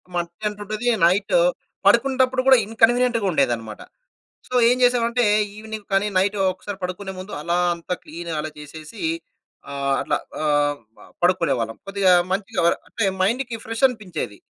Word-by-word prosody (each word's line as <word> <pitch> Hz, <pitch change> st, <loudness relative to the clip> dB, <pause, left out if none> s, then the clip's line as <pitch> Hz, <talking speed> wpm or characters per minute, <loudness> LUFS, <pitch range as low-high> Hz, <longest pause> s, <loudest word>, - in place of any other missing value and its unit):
మట్టి 170 Hz, +3 st, -4 dB
అంటుతది 210 Hz, +3 st, -5 dB, 0.2 s
నైట్ 185 Hz, +4 st, +2 dB, 0.5 s
పడుకుంటప్పుడు 260 Hz, -1 st, +3 dB
కూడా 265 Hz, -1 st, +8 dB
ఇన్కన్వీనియంట్‌గా 230 Hz, +1 st, +2 dB
ఉండేదన్నమాట. 115 Hz, -8 st, -1 dB, 0.7 s
సో -, -, -10 dB, 0.2 s
ఏం 250 Hz, -, +3 dB
చేసామంటే, 245 Hz, -1 st, +2 dB, 0.3 s
ఈవినింగ్ 220 Hz, -1 st, -8 dB
కానీ 195 Hz, +2 st, +2 dB
నైట్ 195 Hz, +2 st, +2 dB, 0.2 s
ఒకసారి 195 Hz, +2 st, -8 dB
పడుకునే 185 Hz, +2 st, -4 dB
ముందు 185 Hz, +3 st, -8 dB
అలా 170 Hz, +3 st, 0 dB, 0.2 s
అంత 170 Hz, +1 st, -11 dB
క్లీన్ 170 Hz, +2 st, -7 dB
అలా 155 Hz, -, -3 dB
చేసేసి 155 Hz, +6 st, -10 dB, 0.7 s
ఆహ్, 140 Hz, -1 st, -1 dB
అట్లా -, -, 0 dB, 0.3 s
ఆహ్, 145 Hz, -1 st, +2 dB, 0.2 s
ప -, -, -17 dB, 0.2 s
పడుకునేవాళ్ళం. 140 Hz, -11 st, +1 dB
కొద్దిగా 195 Hz, -2 st, +2 dB, 0.2 s
మంచిగా 190 Hz, -1 st, -1 dB, 0.3 s
అంటే 230 Hz, -, -3 dB, 0.2 s
మైండ్‌కి 235 Hz, +4 st, 0 dB
ఫ్రెష్ 225 Hz, +3 st, -4 dB
అనిపించేది. 185 Hz, -, -6 dB
195 Hz, 130 wpm, -22 LUFS, 165-225 Hz, 0.7 s, కూడా